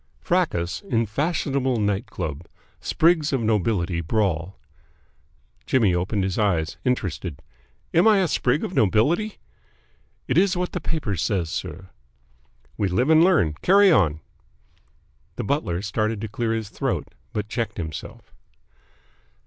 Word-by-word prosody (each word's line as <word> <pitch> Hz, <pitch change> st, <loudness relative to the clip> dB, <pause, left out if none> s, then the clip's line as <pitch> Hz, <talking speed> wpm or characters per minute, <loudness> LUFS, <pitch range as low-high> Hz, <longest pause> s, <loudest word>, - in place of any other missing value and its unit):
FRACAS 85 Hz, -1 st, 0 dB
IN 115 Hz, -1 st, +2 dB
FASHIONABLE 135 Hz, -, -1 dB
NIGHT 105 Hz, +2 st, 0 dB
CLUB 85 Hz, -5 st, -5 dB, 0.3 s
SPRIGS 160 Hz, -3 st, +2 dB
OF 135 Hz, -, +1 dB
NOBILITY 100 Hz, -5 st, 0 dB
BRAWL 90 Hz, -1 st, -1 dB, 1.1 s
Jimmy 110 Hz, -8 st, +3 dB
opened 95 Hz, +3 st, 0 dB
his 95 Hz, +2 st, -1 dB
eyes, 85 Hz, -7 st, 0 dB
interested. 95 Hz, -, -2 dB, 0.5 s
"Am 170 Hz, +6 st, +5 dB
I 215 Hz, -2 st, +6 dB
a 190 Hz, -2 st, +2 dB
sprig 140 Hz, -1 st, +1 dB
of -, -, -4 dB
nobility?" 150 Hz, -, +2 dB, 0.9 s
"It -, -, +3 dB
is 190 Hz, -1 st, +2 dB
what 180 Hz, 0 st, -2 dB
the 180 Hz, -, -4 dB
paper 155 Hz, -, -2 dB
says, 90 Hz, -1 st, -1 dB
sir." 95 Hz, +1 st, -6 dB, 0.9 s
"We 100 Hz, -, +1 dB
live 125 Hz, -, +1 dB
and 160 Hz, +1 st, +7 dB
learn. 170 Hz, -, +3 dB
Carry 200 Hz, +1 st, +6 dB
on." 80 Hz, -, +3 dB, 1.1 s
The -, -, -3 dB
butler 100 Hz, -, -1 dB
started 110 Hz, +1 st, -1 dB
to 110 Hz, -, -3 dB
clear 115 Hz, +2 st, -2 dB
his 110 Hz, -3 st, -3 dB
throat, -, -, -3 dB, 0.2 s
but 105 Hz, 0 st, -3 dB
checked 115 Hz, 0 st, -3 dB
himself. 80 Hz, -3 st, -7 dB
110 Hz, 135 wpm, -24 LUFS, 90-145 Hz, 1.1 s, and